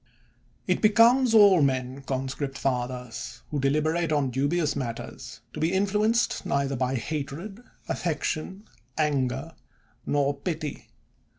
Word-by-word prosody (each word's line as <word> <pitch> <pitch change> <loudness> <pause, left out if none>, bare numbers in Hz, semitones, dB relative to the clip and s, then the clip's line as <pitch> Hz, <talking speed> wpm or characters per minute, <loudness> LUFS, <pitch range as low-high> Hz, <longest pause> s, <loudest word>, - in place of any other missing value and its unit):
It - - 0
becomes 230 +3 +5
all 200 -5 +7
men, 130 -1 0
conscript 135 +1 -3
fathers, 125 -2 -3
who 150 - -1
deliberate 155 +4 +1
on 145 -4 +1
dubious 145 +5 0
matters, 120 -4 -6
to - - -6
be 160 +2 +1
influenced 210 +4 +1
neither 140 0 0
by 130 +1 0
hatred, 155 - -5 0.2
affection, 175 +4 -3 0.3
anger, 140 0 0 0.5
nor 145 0 +1
pity. 150 +1 -5
145 Hz, 110 wpm, -26 LUFS, 135-175 Hz, 0.5 s, all